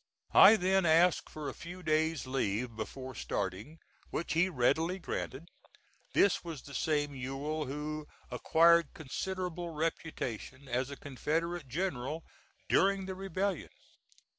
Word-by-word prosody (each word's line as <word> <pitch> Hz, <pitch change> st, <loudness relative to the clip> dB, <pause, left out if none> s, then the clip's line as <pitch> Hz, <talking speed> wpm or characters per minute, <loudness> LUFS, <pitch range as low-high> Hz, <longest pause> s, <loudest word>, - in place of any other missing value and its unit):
I 205 Hz, +3 st, +10 dB
then 190 Hz, -1 st, +2 dB
asked 170 Hz, +1 st, +4 dB
for 155 Hz, -2 st, -6 dB
a -, -, -3 dB
few 180 Hz, +2 st, -9 dB
days' 155 Hz, -1 st, +1 dB
leave 120 Hz, -2 st, -1 dB
before 130 Hz, +4 st, -6 dB
starting, 100 Hz, -, -4 dB, 0.3 s
which 170 Hz, -, -2 dB
he 175 Hz, +3 st, +3 dB
readily 160 Hz, +5 st, +2 dB
granted. 165 Hz, -3 st, -5 dB, 0.6 s
This 200 Hz, -, +4 dB
was 165 Hz, -6 st, -7 dB
the 140 Hz, -, -11 dB
same 145 Hz, 0 st, 0 dB
Ewell 140 Hz, +4 st, -3 dB
who 150 Hz, +2 st, -4 dB, 0.2 s
acquired 170 Hz, -1 st, +4 dB
considerable 175 Hz, +3 st, -4 dB
reputation 150 Hz, -5 st, -4 dB
as 125 Hz, +2 st, -1 dB
a 140 Hz, -, -7 dB
Confederate 160 Hz, +4 st, -2 dB
general 155 Hz, 0 st, -2 dB, 0.4 s
during 195 Hz, 0 st, +3 dB
the 190 Hz, -, -4 dB
rebellion. 190 Hz, -1 st, -2 dB
155 Hz, 125 wpm, -32 LUFS, 135-175 Hz, 0.6 s, I